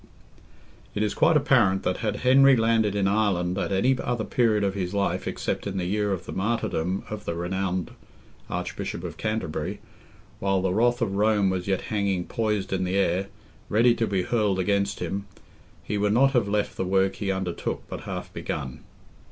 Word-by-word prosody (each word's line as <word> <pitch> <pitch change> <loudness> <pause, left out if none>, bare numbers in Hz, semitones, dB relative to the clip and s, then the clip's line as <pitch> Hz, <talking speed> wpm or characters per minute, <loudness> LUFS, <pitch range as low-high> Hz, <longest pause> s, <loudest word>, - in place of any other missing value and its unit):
It 105 - +1
is 105 - 0
quite 160 -1 +4
apparent 110 -10 +3
that 90 - 0
had 105 -2 -1
Henry 135 +1 +7
landed 115 -3 +2
in 100 -1 +2
Ireland 95 -4 +1
at - - -2
any 120 +8 +3
other 120 -2 -1
period 110 -1 +2
of 100 -1 +1
his 95 0 -3
life 100 -1 0
except - - -3
in - - -3
the 90 - -1
year 105 +2 0
of 90 -2 -3
the - - -7
martyrdom 95 -4 -1
of 105 -1 -6
the 85 - -2
renowned 90 +1 -2 0.6
Archbishop - - -4
of - - -6
Canterbury, 110 -7 -3 0.6
while 95 0 +1
the 95 -1 0
wrath 120 +3 +2
of 100 -3 -2
Rome 105 -2 +3
was 90 0 -3
yet 95 -1 +1
hanging 100 -4 0
poised 105 -5 -1
in 95 -1 0
the 90 +1 -1
air, 95 0 +1 0.4
ready 115 +3 +4
to 115 -1 -1
be 95 -2 0
hurled 105 -4 +1
against 100 +1 0
him, 100 +1 -3 0.6
he 105 0 -2
would 105 0 +2
not 135 +4 +5
have 120 -6 +2
left 105 0 -1
the - - 0
work 95 +1 +1
he 100 -2 -1
undertook 95 -2 -3
but - - -6
half - - -6
begun. 65 -2 -4
100 Hz, 185 wpm, -26 LUFS, 95-110 Hz, 0.6 s, Henry